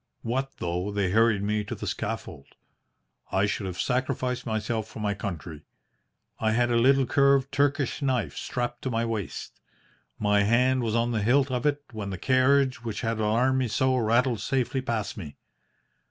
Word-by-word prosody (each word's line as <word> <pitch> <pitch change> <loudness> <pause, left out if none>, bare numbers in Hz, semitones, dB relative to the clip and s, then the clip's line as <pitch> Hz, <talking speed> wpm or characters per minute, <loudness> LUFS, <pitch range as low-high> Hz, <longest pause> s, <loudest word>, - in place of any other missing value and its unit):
What 130 +4 -2
though 90 +3 -2
they 100 -3 0
hurried 110 -1 +3
me 105 +1 0
to 105 - -5
the - - -6
scaffold? 70 - -5 0.8
I 95 +2 +2
should 100 -1 -2
have 90 0 -6
sacrificed 125 -1 -1
myself 110 0 -2
for 110 - -10
my 105 -1 0
country. 85 -6 -6 0.8
I 110 0 +1
had 120 +1 +2
a - - +2
little 135 +3 +4
curved 140 +1 +3
Turkish 140 0 0
knife 125 - 0
strapped 120 -1 -3
to 130 - -2
my 115 -1 0
waist. 110 -4 -5 0.6
My 105 -1 +2
hand 125 +5 +3
was 115 -2 -1
on 120 +1 +1
the 110 -2 0
hilt 130 +5 +3
of 125 +2 0
it 145 0 0
when 105 -3 -5
the 95 - -4
carriage 130 +3 +2
which 115 -3 -4
had 115 -2 -1
alarmed 120 +5 +2
me 130 - 0
so 130 +4 +1
rattled 120 0 +2
safely 130 +2 0
past 115 -5 -3
me. 75 -8 -8
115 Hz, 175 wpm, -27 LUFS, 105-130 Hz, 0.8 s, little